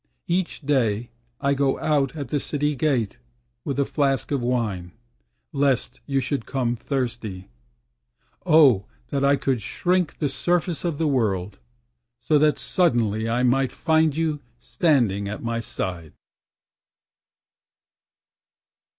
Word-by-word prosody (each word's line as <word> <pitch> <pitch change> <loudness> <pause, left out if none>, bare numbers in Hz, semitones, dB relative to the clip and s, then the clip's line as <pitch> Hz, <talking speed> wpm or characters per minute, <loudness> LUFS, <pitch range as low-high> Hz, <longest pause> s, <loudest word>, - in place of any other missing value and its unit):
Each 175 0 -1
day 120 -6 0 0.3
I 140 0 +1
go 140 -1 +1
out 140 -3 0
at 140 -5 -5
the 145 - 0
City 145 +1 -1
Gate 130 -7 0 0.4
With 140 - -3
a 140 - +3
flask 135 -1 0
of 140 -3 0
wine, 110 -8 -2 0.6
lest 135 -2 0
you 135 -1 +1
should 135 -1 -3
come 125 -3 -1
thirsty. 115 -7 -4 0.9
Oh 145 - +5 0.2
that 140 -1 -1
I 140 +1 +5
could 130 -4 -1
shrink 180 - 0
the 145 - 0
surface 175 +3 0
of 170 -4 -1
the 160 - 0
World, 105 -9 0 0.6
So 145 +5 +2
that 150 0 +3
suddenly 115 - +1
I 120 +2 +1
might 130 +1 +2
find 160 -2 +2
you 160 -2 0 0.2
standing 120 - +1
at 105 - -6
my 115 0 -1
side. 90 -8 -5
135 Hz, 125 wpm, -24 LUFS, 115-150 Hz, 0.9 s, Oh